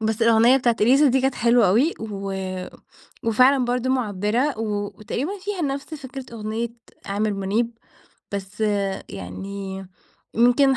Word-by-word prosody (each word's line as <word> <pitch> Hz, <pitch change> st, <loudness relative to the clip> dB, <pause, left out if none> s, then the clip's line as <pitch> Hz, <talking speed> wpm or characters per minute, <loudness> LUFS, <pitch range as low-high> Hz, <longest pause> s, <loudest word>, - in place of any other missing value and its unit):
بس 220 Hz, +1 st, 0 dB
الأغنية 230 Hz, +3 st, +6 dB
بتاعة 240 Hz, -3 st, +2 dB
إليسا 270 Hz, +7 st, +5 dB
دي 260 Hz, +1 st, +3 dB
كانت 265 Hz, 0 st, +1 dB
حلوة 235 Hz, -3 st, +4 dB
أوي. 255 Hz, -, +3 dB
و 200 Hz, -3 st, -4 dB, 0.9 s
وفعلًا 255 Hz, +4 st, +4 dB
برضو 250 Hz, +1 st, 0 dB
معبرة، 230 Hz, +2 st, 0 dB
و 205 Hz, -2 st, -1 dB
وتقريبًا 290 Hz, -, -3 dB
فيها 385 Hz, -2 st, -4 dB
نفس 280 Hz, +2 st, -3 dB
فكرة 270 Hz, -2 st, -7 dB
أغنية 220 Hz, +2 st, -3 dB, 0.4 s
عامر 205 Hz, +1 st, 0 dB
منيب. 220 Hz, +4 st, -1 dB, 0.5 s
بس 200 Hz, +2 st, -6 dB, 0.5 s
يعني 190 Hz, -, -6 dB, 0.5 s
يمكن 250 Hz, +3 st, +4 dB
230 Hz, 130 wpm, -23 LUFS, 205-265 Hz, 0.9 s, الأغنية